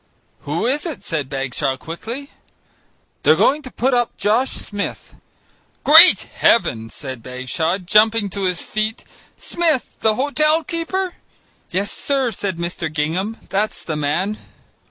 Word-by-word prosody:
"Who 160 +8 -1
is 290 +7 0
it?" 315 - -5
said 150 -5 -3
Bagshaw 135 0 -2
quickly. 230 - -7 0.9
"They're - - +5
going 295 +3 +3
to 265 - -9
put 260 +2 0
up 240 -1 0
Josh 230 +6 +1
Smith." 205 -1 -5 0.7
"Great 325 +5 +9
Heaven!" 115 - +1
said 130 -3 -7
Bagshaw, 130 +8 -2
jumping 210 +3 +3
to 200 0 -2
his 180 -2 -1
feet; 215 +1 -3 0.3
"Smith! 320 -7 0
the 220 -1 +2
hotel 305 +4 +2
keeper." 345 +5 -2 0.6
"Yes, 200 +3 -1
sir," 270 -4 -1
said 195 -3 -3
Mr. 170 -1 -4
Gingham, 170 +9 -2
"that's 210 +2 -2
the 160 - -3
man." 165 +8 -1
210 Hz, 135 wpm, -20 LUFS, 160-265 Hz, 0.9 s, Great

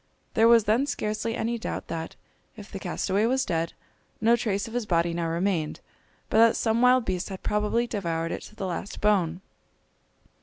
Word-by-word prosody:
There 225 +1 +5
was 230 -1 +6
then 225 +7 +2
scarcely 220 -3 -2
any 235 0 -2
doubt - - -4
that, 165 0 -5 0.4
if 210 -1 -11
the 195 - -5
castaway 190 +4 0
was 260 +2 +1
dead, 165 -2 -1 0.5
no 230 +2 +4
trace 205 -3 -1
of 225 - -9
his 240 -3 -2
body 170 -2 +2
now 170 0 -1
remained, 170 -1 -1 0.5
but 220 - +2
that 230 0 +6
some 225 0 +1
wild 250 -1 +5
beast 185 +1 -2
had 190 -1 -7
probably 210 +3 +1
devoured 165 -7 -2
it - - -4
to 215 - -14
the 195 - -4
last 185 +2 -5
bone. 185 -5 +1
210 Hz, 185 wpm, -26 LUFS, 175-230 Hz, 0.5 s, was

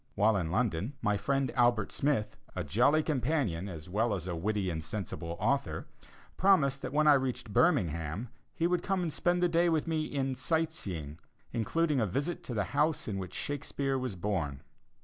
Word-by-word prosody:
While 105 +1 +4
in 90 -5 0
London, 105 - 0
my 105 -2 +2
friend 135 +5 0
Albert 120 -3 +3
Smith, 135 -7 0 0.2
a - - -2
jolly 125 - +3
companion, 125 - 0
as 80 -3 -8
well 105 +4 +1
as 90 -3 -5
a 90 -2 -3
witty 95 +2 -1
and 80 -1 -4
sensible 85 -2 -5
author, - - 0 0.5
promised 140 -9 +4
that 130 - -4
when 155 +2 +3
I 150 - +8
reached 130 -6 -1
Birmingham 85 - +1 0.3
he 170 -3 0
would 175 0 +2
come 190 0 0
and 160 -3 -2
spend 175 0 +1
a - - +5
day 170 +1 +3
with 160 -2 +1
me 160 -2 0
in 135 -3 -1
"sight 160 +5 0
seeing," 80 - -5 0.3
including 145 +6 +1
a 110 - +2
visit 140 - -2
to 120 - -4
the 105 - +1
house 155 +2 +1
in 100 -3 -2
which 90 -2 -6
Shakespeare 140 -1 -2
was 125 -6 -3
born. 85 -8 -2
125 Hz, 190 wpm, -31 LUFS, 95-155 Hz, 0.5 s, I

